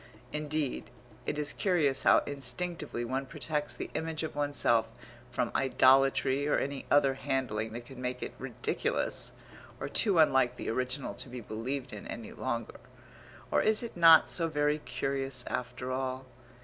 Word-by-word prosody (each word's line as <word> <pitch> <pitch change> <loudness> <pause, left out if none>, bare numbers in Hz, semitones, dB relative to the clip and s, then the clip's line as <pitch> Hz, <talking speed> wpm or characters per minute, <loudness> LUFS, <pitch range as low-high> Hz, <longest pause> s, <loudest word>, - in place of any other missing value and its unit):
Indeed, 150 -2 -2 0.4
it 150 - -1
is 150 -1 -1
curious 160 -8 +1
how - - +5
instinctively 140 -1 -2
one 130 +3 -2
protects 150 +2 -2
the - - -6
image 160 0 -3
of 160 - -4
oneself 145 -6 +2 0.4
from - - -1
idolatry 135 +1 +4
or 150 - +3
any 140 0 -3
other 140 -2 +4
handling 130 -5 -2
that 120 +1 -7
could 130 0 -11
make 125 0 -3
it - - -5
ridiculous, 475 +2 -1 0.5
or - - -3
too 200 -6 +2
unlike 130 -5 +4
the - - -3
original 130 +3 -2
to - - -8
be 125 0 -6
believed 120 +5 -4
in 105 - -7
any 115 - -7
longer. 115 -3 -4 0.7
Or - - +3
is 215 +2 +3
it 235 - -6
not 165 -2 +7
so 165 -2 +1
very 150 -1 +1
curious 135 -1 -3
after 125 +1 -4
all? 130 0 -3
135 Hz, 155 wpm, -31 LUFS, 125-150 Hz, 0.7 s, not